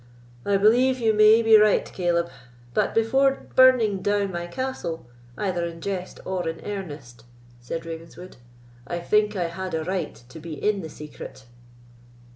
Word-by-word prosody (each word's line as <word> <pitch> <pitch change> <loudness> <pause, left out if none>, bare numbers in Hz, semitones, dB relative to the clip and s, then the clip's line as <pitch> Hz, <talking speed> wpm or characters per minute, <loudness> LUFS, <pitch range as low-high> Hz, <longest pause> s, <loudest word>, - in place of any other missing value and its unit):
"I 200 -1 +3
believe 245 +6 +4
you 225 -3 +2
may 215 +2 +6
be 225 -1 +6
right, 210 -1 +4
Caleb; 170 -2 -1 0.4
but, - - 0
before 265 +5 +2
burning 240 -7 +5
down 205 -1 0
my 175 -1 -4
castle, 260 - -4 0.3
either 185 -4 -1
in 170 -1 -5
jest 185 0 -5
or 180 -3 -2
in 165 0 -6
earnest," 145 - -7 0.4
said 165 +8 -6
Ravenswood, 165 +2 -9 0.5
"I 175 - -3
think 210 +4 +1
I 175 -3 -1
had 185 +1 -5
a 160 - -2
right 185 -2 -3
to 145 - -10
be 160 0 -8
in 205 +6 0
the 160 - -7
secret." 150 -3 -10
190 Hz, 155 wpm, -24 LUFS, 165-215 Hz, 0.5 s, may